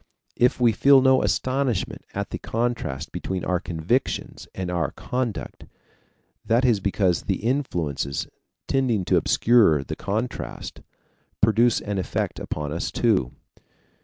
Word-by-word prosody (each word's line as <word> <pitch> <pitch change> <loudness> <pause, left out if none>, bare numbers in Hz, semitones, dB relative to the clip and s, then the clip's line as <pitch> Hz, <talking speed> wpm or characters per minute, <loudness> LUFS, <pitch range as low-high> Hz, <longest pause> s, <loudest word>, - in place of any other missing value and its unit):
If 125 +1 +2
we 120 -2 +5
feel 135 +5 +6
no 130 0 +4
astonishment 130 -6 -1
at - - -3
the - - -4
contrast 115 - -2
between 90 +2 -4
our 90 -1 +1
convictions 90 +9 -2
and 95 -1 -3
our 85 -1 0
conduct, 125 -4 -4 0.8
that 120 +3 +2
is 115 -5 +3
because 95 -2 +1
the 95 0 -2
influences, 85 - -1 0.4
tending 120 -8 +1
to - - +3
obscure 105 - +4
the - - -5
contrast, 110 +5 -4 0.6
produce 115 +2 +3
an 100 -2 -3
effect 90 - -2
upon 75 -1 -4
us 85 - -2
too. 95 - +1
105 Hz, 130 wpm, -24 LUFS, 90-125 Hz, 0.8 s, feel